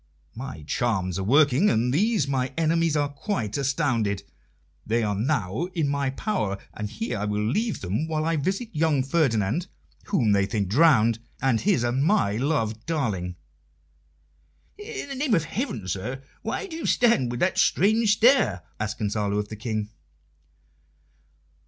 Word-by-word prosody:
"My 120 - -7
charms 95 +1 -1
are - - -2
working, 145 - +4
and 120 +3 +1
these 205 - +2
my 130 -2 -1
enemies 165 -1 +2
are 145 -1 +2
quite 140 - -3
astounded. 125 -8 0 0.6
They 115 +1 0
are 105 -1 0
now 110 - -1
in 155 -4 +1
my 140 -1 0
power, 130 - -2 0.2
and 105 0 -5
here 225 - -4
I 105 - -1
will 105 0 -1
leave 215 - -1
them 105 - -2
while 155 -1 -1
I 165 0 +1
visit 190 - -1
young 150 -3 +2
Ferdinand 135 - +1 0.4
whom 120 - +1
they 100 -1 +3
think 100 -2 -1
drowned 115 - +4 0.2
and 130 -4 +1
his 185 - +2
and 120 +3 +1
my 160 - +2
loved 115 -5 -1
darling." 105 - -2 1.4
"In 420 -6 -6
the - - -4
name 265 -3 +1
of 165 - +1
heaven, 160 - -4
sir, 110 +9 -4 0.2
why 225 - -3
do 350 -5 -8
you 330 - -3
stand 230 - +3
with 120 0 -4
that 190 +1 +2
strange 215 +3 +3
stare?" 225 - +3 0.2
asked 110 0 -3
Gonzalo 105 -1 -1
of 105 0 -2
the 110 - -6
King. 110 -1 -3
130 Hz, 160 wpm, -25 LUFS, 105-165 Hz, 1.4 s, working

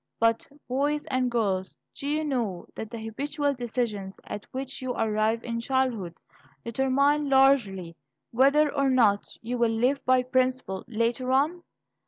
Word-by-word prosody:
But, 230 0 +2 0.2
boys 290 +4 0
and 255 -1 +1
girls, 195 -6 -1 0.2
do 280 - -7
you 305 +2 0
know 235 -11 -2
that 220 - -6
the 235 - -7
habitual 280 +6 -2
decisions 230 -6 -3
at 205 0 -7
which 265 0 -5
you 255 -1 -2
arrive 220 +1 0
in 230 -1 -3
childhood, 235 -8 -1 0.5
determine 275 +4 +2
largely 235 -11 +3 0.4
whether 280 +5 +4
or 275 -1 +2
not 220 -6 +3 0.2
you 245 +2 -3
will 235 -1 +3
live 245 +5 +1
by 255 0 +3
principle 255 -6 0
later 235 +2 -1
on? 300 +7 +2
250 Hz, 145 wpm, -27 LUFS, 225-270 Hz, 0.5 s, whether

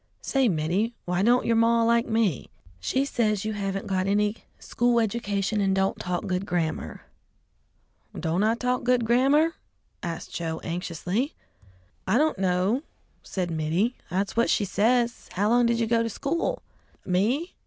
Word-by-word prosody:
"Say, 270 -3 +2
Mittie, 180 +8 0
why 180 +1 0
don't 240 +4 +3
yer 230 - +2
maw 230 0 +4
like 235 0 +3
me?" 220 - 0 0.3
"She 265 - 0
says 215 -6 0
you 215 - -1
haven't 195 -1 -3
got 185 -1 -1
any 210 +2 +1 0.2
school 240 0 +1
education 205 -2 -1
and 195 -1 +2
don't 190 0 0
talk 180 +2 -3
good 185 -1 -1
grammar." 165 -3 -2 1.2
"Don't 165 +3 0
I 220 +2 +3
talk 250 +1 -1
good 245 -1 +2
grammar?" 275 +7 +3 0.5
asked 170 -1 -5
Joe 165 -1 -3
anxiously. 180 - -2 0.7
"I - - +3
don't 310 -7 +2
know," 190 +6 +1 0.4
said 180 -3 -3
Mittie; 165 +9 0 0.2
"that's 195 +2 -1
what 235 0 +2
she 205 - +2
says. 235 +4 +1
How 205 +3 +1
long 240 +1 +4
did 235 0 +1
you 230 - +2
go 230 +1 +2
to 230 - -1
school?" 330 - -2 0.4
"Me? 225 - 0
215 Hz, 155 wpm, -26 LUFS, 185-235 Hz, 1.2 s, maw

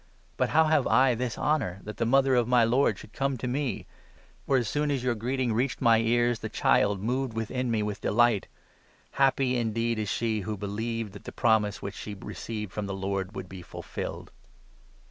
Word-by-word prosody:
But - - +1
how 160 - +5
have 155 -4 +2
I 130 +2 +4
this 120 0 -3
honour, 135 - 0
that 105 - -7
the 115 - 0
mother 135 +1 +4
of 120 -2 +3
my 125 -1 +4
43 115 - +1
Lord 130 -6 +3
should 110 - -13
come 135 -1 -1
to 125 - -4
me? 130 -3 -2 0.6
For, 135 - +4
as 120 -3 0
soon 150 +5 0
as 135 -3 -1
your 125 -1 +1
greeting 125 +3 -1
44 110 - 0
reached 130 0 -1
my 115 -3 +5
ears, 120 0 +2
the 110 - -5
child 100 -2 +2
moved 125 +1 -1
within 125 +3 -2
me 110 -2 +1
with 105 -1 -4
delight! 115 -2 +2 0.6
Happy 135 -1 +2
indeed 115 0 0
is 105 -2 -2
she 110 -1 0
who 105 +1 -4
believed 110 +2 -3
chat 105 - -12
the - - -6
promise 110 -4 +1
which 100 - -4
she 105 - -7
45 95 - -11
received 105 +1 -5
from 105 -1 -3
the 95 - -3
Lord 95 +1 -3
would 95 - -6
be 95 0 -9
fulfilled." - - -7
115 Hz, 210 wpm, -28 LUFS, 105-125 Hz, 0.6 s, how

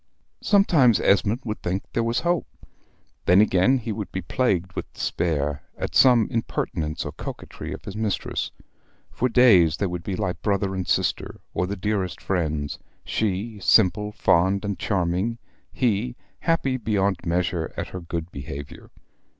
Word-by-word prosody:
Sometimes 160 - +4
Esmond 100 +5 +2
would 110 -1 -4
think 95 +3 -2
there 115 - +1
was 115 +1 0
hope. 175 -1 0 0.8
Then 90 +2 +6
again 105 +5 +4
he 115 -2 -4
would 105 -1 -5
be 95 - -4
plagued 95 -4 0
with - - -6
despair, 75 -3 -1 0.2
at - - -4
some 120 -4 +6
impertinence 80 -8 -2
or - - -4
coquetry 80 +3 -7
of 95 - -7
his 100 -1 -6
mistress. 110 -2 -2 0.6
For 125 - 0
days 95 -11 +5
they 100 - 0
would 90 -2 -3
be 95 +2 -3
like 95 -2 -3
brother 100 -2 0
and 95 -1 -3
sister, - - 0
or 90 - 0
the 100 - -3
dearest 100 -2 -2
friends 80 -6 -2 0.3
she, 105 +1 -2
simple, 105 +1 +3
fond, 100 -1 +2
and 100 -1 -3
charming 95 +3 0 0.3
he, 120 0 0 0.2
happy 135 -6 +1
beyond 100 -4 0
measure 85 -1 -1
at - - -3
her 90 - -6
good 85 0 -5
behavior. 70 +1 -8
100 Hz, 150 wpm, -24 LUFS, 90-115 Hz, 0.8 s, Then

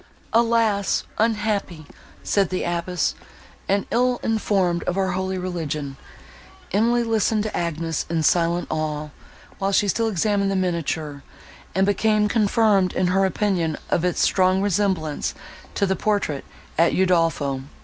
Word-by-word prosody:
"Alas! 230 -3 +2 0.2
unhappy!" 210 -7 0 0.4
said 195 -3 +1
the 185 - -2
abbess, 175 0 -1 0.6
"and 200 +1 +1
ill 245 +1 +2
informed 195 -6 +1
of 180 - -1
our 190 -1 +1
holy 190 +1 -2
religion!" 155 -6 -4 0.8
Emily 235 +4 +2
listened 220 -1 +1
to 215 - -4
Agnes, 165 -2 -2
in 165 -1 0
silent 170 +2 +2
awe, 155 -1 -2 0.5
while 195 0 0
she 205 +1 +3
still 225 +4 +1
examined 200 0 +1
the 195 - 0
miniature, 160 -5 -2 0.5
and 190 +1 +3
became 210 +1 +2
confirmed 210 -3 +2
in 180 -1 +1
her 195 0 +3
opinion 185 -5 0
of 170 - +2
its 180 -1 0
strong 185 0 +3
resemblance 190 -6 0 0.4
to 200 - +2
the 190 0 0
portrait 200 -11 -1 0.3
at 170 0 +4
Udolpho. 165 -7 +1
190 Hz, 135 wpm, -23 LUFS, 170-210 Hz, 0.8 s, at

